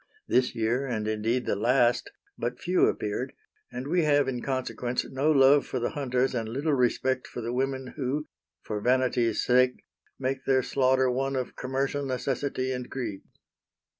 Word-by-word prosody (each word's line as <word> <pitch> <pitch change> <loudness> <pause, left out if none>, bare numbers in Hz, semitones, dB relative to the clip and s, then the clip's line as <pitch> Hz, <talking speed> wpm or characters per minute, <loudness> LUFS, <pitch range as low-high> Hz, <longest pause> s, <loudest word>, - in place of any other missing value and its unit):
This 125 0 +2
year, 120 +5 0
and 110 -4 -2
indeed 110 +3 0
the - - 0
last, 120 +3 +2 0.3
but 120 +1 -3
few 180 +1 +3
appeared, 105 -1 -2 0.4
and 125 +2 -5
we 175 +3 +2
have 145 -2 +3
in 125 -2 -2
consequence 130 -2 -2
no 135 +3 0
love 140 -1 +5
for 130 - -2
the 120 - -1
hunters 130 -3 0
and 115 -3 -2
little 140 +6 -1
respect 130 0 +1
for - - -7
the 120 +1 -3
women 130 0 -2
who, 140 +3 -1 0.4
for 105 -1 -4
vanity's 125 -2 +2
sake, 125 0 +3 0.3
make 135 0 -2
their 130 -1 +3
slaughter 130 -1 +2
one 135 +2 -1
of 130 -1 -3
commercial 135 +2 -2
necessity 130 0 -2
and 125 -1 -4
greed." 120 -7 -4
130 Hz, 165 wpm, -27 LUFS, 120-135 Hz, 0.4 s, love